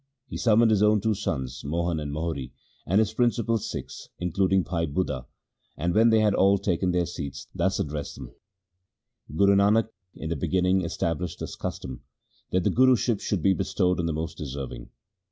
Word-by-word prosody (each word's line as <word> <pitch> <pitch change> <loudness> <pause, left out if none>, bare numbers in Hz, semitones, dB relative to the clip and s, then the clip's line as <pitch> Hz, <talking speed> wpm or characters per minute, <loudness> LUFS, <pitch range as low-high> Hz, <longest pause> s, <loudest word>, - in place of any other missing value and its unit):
He - - -5
summoned 115 0 +4
his 105 -2 +3
own 105 0 +4
two 110 +2 +1
sons, 65 -8 -3
Mohan 85 +2 -1
and 75 -1 -4
Mohri, 75 -4 -4 0.3
and 95 - +2
his 110 0 +2
principal 115 -1 +1
Sikhs, - - -7
including 95 +2 +1
Bhai 85 -2 -2
Budha, 70 -5 -2 0.5
and, 85 +3 0
when 115 +2 +5
they 110 -1 +4
had 105 -2 +3
all 100 +1 +4
taken 95 -2 0
their 90 -1 +1
seats, 80 -6 -6
thus 95 +2 0
addressed 75 -2 -4
them: 65 -3 -9 0.5
' 85 -4 -18
Guru 100 +2 +5
Nanak 105 +3 +3 0.3
in 80 - -6
the - - 0
begin 90 +5 0
ning 95 +1 +3
established 85 0 -2
this - - -6
custom, 65 -2 -6 0.5
that 90 -1 +1
the - - +2
Guruship 125 -3 +3
should 95 -6 -2
be 95 - +5
bestowed 90 +1 0
on 85 - 0
the - - 0
most 80 +1 -4
deserving. 70 -2 -6
90 Hz, 185 wpm, -26 LUFS, 80-105 Hz, 0.5 s, when